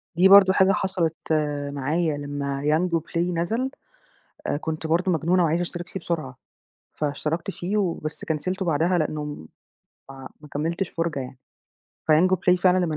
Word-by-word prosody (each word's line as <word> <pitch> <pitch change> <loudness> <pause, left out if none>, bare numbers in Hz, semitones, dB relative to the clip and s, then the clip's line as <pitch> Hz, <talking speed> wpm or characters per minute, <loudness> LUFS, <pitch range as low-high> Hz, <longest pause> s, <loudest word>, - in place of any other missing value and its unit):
دي 180 +3 +6
برضه 195 -1 +8
حاجة 190 0 +4
حصلِت 190 -5 0 0.6
معايا 150 +2 0
لمّا 140 -1 -4
Yango 165 +3 +2
Play - - -3 0.2
نزل، 225 +10 0 0.8
آآ - - 0
كنت 160 +1 -4
برضه 175 +3 +2
مجنونة 170 +2 +2
وعايزة 165 +2 +1
أشترك 175 0 -5
فيه 190 - -5
بسرعة. 155 -7 -4 0.6
فاشتركت 155 +5 -2
فيه 190 +2 -3
وبس 170 -6 -2
كنسلته 185 +5 -2
بعدها 170 +2 +2
لإنّه 155 -1 -1
م 145 - -7 0.9
ما 150 - -13
كملتش 170 +5 -1
فُرجة 165 -4 -2
يعني. 130 0 -8 0.7
فYango 185 +4 +5
Play 180 0 +2
فعلًا 185 -1 +4
لمّا 160 -3 -2
165 Hz, 150 wpm, -24 LUFS, 150-185 Hz, 0.9 s, برضه